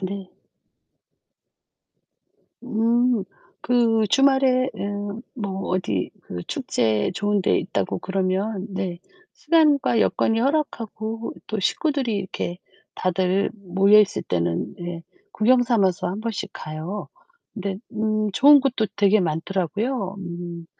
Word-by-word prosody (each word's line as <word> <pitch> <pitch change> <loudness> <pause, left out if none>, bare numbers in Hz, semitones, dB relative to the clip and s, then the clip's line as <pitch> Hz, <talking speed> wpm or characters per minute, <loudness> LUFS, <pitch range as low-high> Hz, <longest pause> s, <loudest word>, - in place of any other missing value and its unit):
네. 190 0 -5 2.3
음 235 -1 +1 0.4
그 230 -2 +3
주말에 265 -2 +4
음. 205 +2 -4
뭐 195 -6 -4
어디 110 - -1
그 90 -1 -7
축제 110 +5 0
좋은 205 +1 +1
데 - - +3
있다고 185 - -2
그러면 190 +2 -1
네 190 -3 -4 0.4
시간과 295 -5 +3
여건이 225 +1 +2
허락하고 230 -5 -2
또 215 -1 -3
식구들이 265 - 0
이렇게 185 -2 -4 0.4
다들 185 +2 +1
모여있을 200 +1 +3
때는 85 -1 -1
네 175 -1 -7 0.3
구경 245 - +4
삼아서 200 -8 +1
1 190 +4 -4
번씩 225 -2 -4
가요. 155 +7 -6 0.5
근데 200 -3 -3 0.2
음 215 -1 0
좋은 285 +8 +7
곳도 260 -5 0
되게 205 +1 +4
많더라고요. 190 - -2
음 175 -2 -7
205 Hz, 215 characters per minute, -23 LUFS, 185-235 Hz, 2.3 s, 좋은